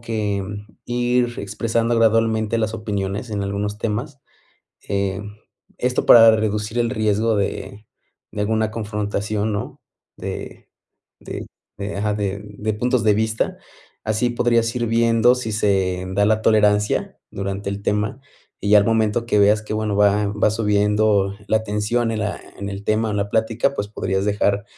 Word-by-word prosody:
que 105 -4 -2 0.4
ir 120 0 +1
expresando 115 +3 -1
gradualmente 115 0 +2
las 110 0 -1
opiniones 105 0 -3
en 100 -1 -2
algunos 100 +1 -3
temas, 120 +6 -3 0.7
eh, 100 0 -1 0.6
esto 125 0 0
para 115 -1 +8
reducir 105 +1 -1
el 120 -1 +1
riesgo 110 -1 +1
de 100 +1 -3 0.5
de 105 - -3
alguna 110 +1 0
confrontación, 105 0 -2
¿no? 105 - -5 0.4
De - - -7 0.5
de - - -7 0.3
de 100 0 -4
ajá, 105 +1 0
de 100 -1 -3
de 105 +1 -4
puntos 125 +2 0
de 105 -1 +4
vista. 110 +1 -1 0.5
Así 110 +3 0
podrías 115 -1 +1
ir 120 -1 0
viendo 115 +1 +4
si 125 -3 -4
se 95 -3 +1
da 100 +1 +3
la 110 +1 +2
tolerancia 105 -1 +2
durante 100 +1 -4
el 100 0 -5
tema, 105 +5 -1 0.4
y 100 - -2
ya 105 - +8
al 100 - +3
momento 115 0 +1
que 105 - +2
veas 105 +1 +4
que, 110 - -6
bueno, 105 -2 -1
va 105 0 +3
va 105 +1 +1
subiendo 105 -2 +2
la 110 0 +2
tensión 110 +3 0
en 110 -1 -2
la 105 0 -3 0.2
en 100 0 -4
el 100 0 -6
tema 110 +1 +1
o - - -2
en - - -1
la 100 - -1
plática, 115 +4 +1
pues, 100 -4 -3
podrías 95 -2 -2
dejar 100 0 +1
105 Hz, 160 wpm, -21 LUFS, 100-115 Hz, 0.7 s, para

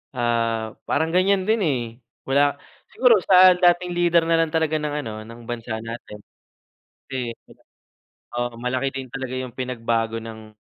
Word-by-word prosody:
Ah, 115 -2 -1
parang 160 - +1
ganyan 190 +1 +2
din, 220 +1 +3
eh, 140 -6 +1 0.5
wala 140 +1 +2 0.3
siguro 250 -3 +5
sa 185 -1 +7
dating 175 0 +2
leader 170 -1 +3
na 165 - +3
lang 155 - -4
talaga 160 -1 +1
ng 150 -1 -2
ano, 115 -6 -5
ng 115 +2 -12
bansa 115 -2 -4
natin. 115 -2 -8 0.9
Kasi 125 -3 -3
eh, - - -17 0.8
oo, 120 -1 -3
malaki 130 +2 -1
din 135 -1 -6
talaga 130 0 -6
yung 130 -2 -6
pinagbago 115 -3 -2
ng 110 -1 -10
130 Hz, 150 wpm, -23 LUFS, 115-165 Hz, 0.9 s, sa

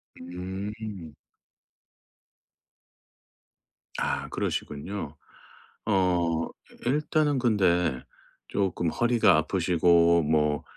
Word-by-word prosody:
음. 95 0 -7 2.8
아 - - -1
그러시군요. 75 +1 -4 0.7
어 85 -4 +1 0.3
이 120 - 0
일단은 150 +1 +1
근데 90 - +2 0.5
쪼끔 95 -4 -1
허리가 115 -3 +3
아프시고 85 0 +3
뭐 75 -1 +1
90 Hz, 135 characters per minute, -27 LUFS, 80-105 Hz, 2.8 s, 허리가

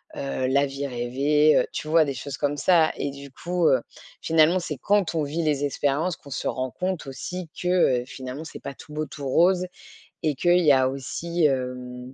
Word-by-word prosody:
heu, 135 -2 -2
la 140 +2 +3
vie 140 +1 -4
rêvée, 140 +5 +2
heu, - - +2
tu 155 - -5
vois? 160 0 +4
Des 140 -2 -3
choses 135 +2 -6
comme 145 0 -1
ça, 160 +2 +4
et 140 - -2
du 140 0 -10
coup, 175 +3 0
heu, 130 -2 +4 0.4
finalement, 165 +3 +4
c'est 150 -4 -5
quand 200 -5 +2
on 160 - 0
vit 160 +4 -2
les 145 -2 +1
expériences 145 +5 0
qu'on 140 - -15
se - - -3
rend 130 +1 -2
compte 185 +2 -3
aussi 165 +6 -6
que, 180 -9 +3
heu, - - -7
finalement, 130 +3 -7
c'est - - -9
pas 140 - -5
tout 150 - -13
beau, 155 0 -2
tout 145 -2 -7
rose, 180 +5 +3 0.5
et 155 -2 0
qu'il 175 +5 +3
y 155 -4 +5
a 130 -1 +4
aussi 155 +5 -2
hem. 125 -1 -2
145 Hz, 210 wpm, -25 LUFS, 135-165 Hz, 0.5 s, y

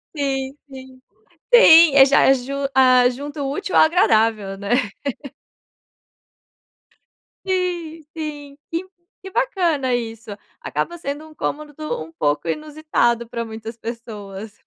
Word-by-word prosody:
Sim 270 -2 -2
sim, 260 -1 -12 0.5
sim, 335 - +8
eu 270 - +9
já 275 +1 +4
aju 270 0 +1 0.2
ah, 255 -1 +5
junto 285 +4 -6
útil 380 +7 -4
ao - - +7
agradável, 220 - +2
né? 200 +2 -4 2.7
Sim, 350 -4 -3
sim, 290 -2 -7
que 340 +3 -3 0.3
que 385 0 -10
bacana 345 - 0
isso, 225 -2 -6 0.3
acaba 345 - -4
sendo 290 -1 -6
um 310 - -16
cômodo 300 0 -5 0.3
um 160 - -13
pouco 150 0 -1
inusitado 300 - -1
pra 235 -1 -4
muitas 225 +1 -8
pessoas. 220 -3 -8
270 Hz, 115 wpm, -21 LUFS, 230-310 Hz, 2.7 s, eu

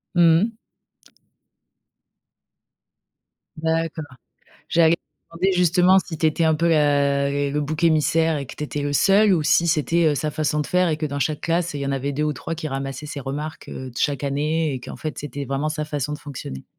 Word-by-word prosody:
Mmh 165 0 +5
mh. 225 0 -3 3.0
D'accord, 160 0 -1 0.7
j'allais 165 0 +4
te - - -13 0.3
demander, 190 +2 +2
justement, 180 +2 +5
si 170 -3 -4
tu 160 - +1
étais 160 +1 +1
un 160 -1 +4
peu 170 +2 +1
la 140 -3 +2
les 140 0 -1
le 150 +1 -1
bouc 150 +2 -3
émissaire 160 0 +3
et 140 - -5
que - - -10
tu - - -7
étais 145 0 -3
le 145 0 -2
seul 195 +5 +4
ou 160 - +1
si 170 +3 +3
c'était, 165 +1 +2
heu, 150 - +3
sa 150 +2 -2
façon 150 0 -1
de - - -3
faire 180 -1 +2
et 155 - 0
que 155 - -4
dans 140 0 -4
chaque 150 +2 -1
classe, 170 -1 -1
il 145 - -4
y 140 - -2
en 140 - -1
avait 140 +1 -2
2 150 +2 -2
ou 150 0 +1
3 165 - -5
qui 155 -1 -5
ramassaient 135 +2 -5
ses 145 - -6
remarques, 150 +4 -6
heu, 130 -1 -7
de 120 - -17
chaque 145 -2 0
année 150 +2 0
et 130 - -5
qu'en - - -8
fait, 155 -1 -5
c'était 140 -1 -5
vraiment 140 +3 -1
sa 155 0 -3
façon 150 -1 -3
de 150 - -5
fonctionner? 120 - -8
150 Hz, 215 wpm, -22 LUFS, 140-165 Hz, 3.0 s, Mmh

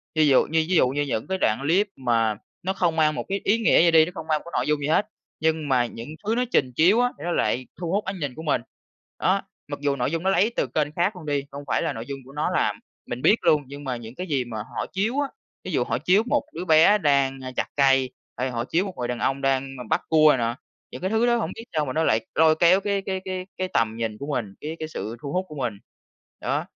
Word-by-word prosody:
Ví 155 -1 +4
dụ 135 -2 +5
như 160 0 +1
ví 185 - +2
dụ 130 - +5
như 140 +3 -1
những 120 -6 -2
cái 190 0 -1
đoạn 110 - +1
clip 180 +8 +2
mà 115 -4 +1 0.3
nó 190 +1 0
không 175 -4 0
mang 155 -1 +3
một - - -4
cái 195 +1 -2
ý 210 +3 +3
nghĩa 230 - +4
gì 170 - +5
đi, 160 -1 +7
nó 180 - -7
không 160 - -7
mang 155 -1 +2
một - - -16
cái 170 - -10
nội - - -2
dung 150 -1 +2
gì 145 - -2
hết, 180 +6 +3 0.3
nhưng 160 -2 0
mà 125 -2 +3
những 115 +2 -8 0.2
thứ 220 +2 +1
nó 250 - +2
trình 130 -2 +2
chiếu 185 - +5
á 245 - +3
thì 145 - -10
nó 175 - -1
lại 125 -4 0
thu 170 -2 -3
hút 205 +3 0
ánh 190 -1 -4
nhìn 140 -4 -3
của 160 - -8
mình. 150 -6 +1 0.6
Đó, - - +2 0.3
mặc - - -5
dù 140 -1 +1
nội 125 +1 -1
dung 165 0 -2
nó 190 - +2
lấy 200 +4 +3
từ - - 0
kênh 150 +4 0
khác 185 +4 +1
luôn 175 - -10
đi, 145 -2 0
không 140 +1 -7
phải - - +1
là - - -1
nội 115 +1 -6
dung 135 +1 -6
của 135 - -13
nó 150 - -1
làm, - - +1 0.3
mình 120 +1 -5
biết 210 - +5
luôn, 150 -1 +3
nhưng 140 +1 -9
mà 130 -2 -2
những 115 +1 -10
cái 185 - -5
gì 135 -6 0
mà 115 -2 -6
họ 105 - -4
chiếu 220 +8 0
á, 285 - +1 0.4
ví - - -5
dụ - - +1
họ - - -1
chiếu 195 +4 +3
một 245 - +1
đứa 175 +3 -5
bé 160 +5 +6
đang, 140 -6 +2
a, 130 - -5
chặt - - -1
cây, 135 -2 +4 0.3
hay 130 +1 -1
họ 120 -1 -2
chiếu 175 +8 +1
một 195 - -6
người 125 -1 -2
đàn 120 -1 -3
ông 135 +2 0
đang 135 0 0
m 125 -3 -8
bắt - - +2
cua 155 -1 +6
này - - +2
nà, 115 -1 -1 0.4
những 125 - -8
cái 185 - -1
thứ 220 +3 +2
đó 240 0 +3
hổng 230 - -2
biết 225 - -8
sao 150 - +1
mà 130 - -4
nó 160 - +1
lại 110 -6 +2
lôi 160 0 +5
kéo 180 +3 +6
cái 200 0 0
cái 190 -1 -3
cái 185 -1 -4
cái 185 - -1
tầm 110 -1 +1
nhìn 115 -2 -3
của 140 - -7
mình, 110 -8 -2
cái 155 +2 -4
cái 155 - -4
sự 110 -7 -5
thu 140 - -5
hút 185 +1 0
của 150 - -10
mình. 125 -6 -2 0.7
Đó, - - -1
150 Hz, 290 wpm, -24 LUFS, 130-185 Hz, 0.7 s, đi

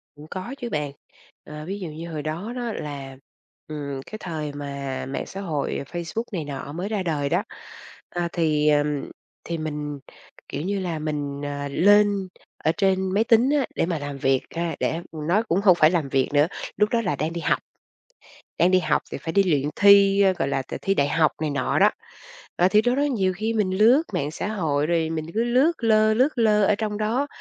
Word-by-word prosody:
Cũng 150 +1 -12
có 190 +7 -5
chứ 240 -3 -5
bạn. 150 -7 -2 0.5
Ờ, 150 0 -8
ví 195 +4 -4
dụ 185 - -5
như 160 +3 -7
hồi 155 -2 -4
đó 170 +10 -4
đó 240 -2 -3
là, 140 -5 -6 0.5
ừm, 140 -3 -5
cái 215 - -7
thời 155 -5 -4
mà 140 -2 -5
mạng 135 - -3
xã 195 - -7
hội 155 -7 -2
Facebook 175 +6 -3
này 175 -6 -3
nọ 140 0 -6
mới 180 +5 -4
ra 210 -3 -1
đời 150 -5 -1
đó, - - +1 0.7
ờ, 175 -1 -2
thì, 155 -3 +2
ừm, 145 -1 +1 0.3
thì 170 - -3
mình, 150 -2 -4 0.5
kiểu 140 - -4
như 195 +2 -2
mình, 145 -2 -3
ờ, 145 0 -3
lên 205 +3 +4 0.4
ở 155 - +3
trên 190 -1 +1
máy 210 +3 +3
tính 230 +3 +4
á, 275 - +1
để - - +1
mà 165 -2 -2
làm 145 -1 -5
việc 135 -1 +2
ha. 170 0 -2
Để 160 - 0
nói 165 +7 0
cũng 190 -3 0
không 190 -3 +6
phải 155 -1 +5
làm 165 -6 0
việc 135 -1 +1
nữa, 145 +1 +4 0.3
lúc 210 +1 +3
đó 235 0 +1
là 185 -9 -1
đang 155 +4 -2
đi 170 - -4
học. 155 - +1 1.0
Đang 175 +2 +4
đi 185 - +5
học 155 -4 +1
thì - - -4
phải 160 +2 -5
đi 200 - +5
luyện 150 -6 +1
thi, 200 0 +6 0.2
gọi - - +1
là, 135 -1 0 0.2
thi 195 - +1
đại 140 -7 +2
học 155 -1 +3
này 155 - 0
nọ 140 -3 0
đó. - - +6 0.7
Ờ, 180 - +4
thì 210 +2 +4
đó 245 +2 +2
đó 280 - +1
nhiều 220 -10 +1
khi 220 +3 -1
mình 210 -4 +1
lướt 240 +8 +6
mạng 145 +1 -1
xã 165 +4 -4
hội 155 -9 0
rồi 165 -1 +1
mình 160 -1 -3
cứ 225 +2 +1
lướt 255 +7 +3
lơ 215 -1 +4
lướt 260 +4 +2
lơ 210 -2 +4
ở 210 - +4
trong 210 0 -3
đó, 230 +6 0
170 Hz, 210 wpm, -24 LUFS, 150-205 Hz, 1.0 s, không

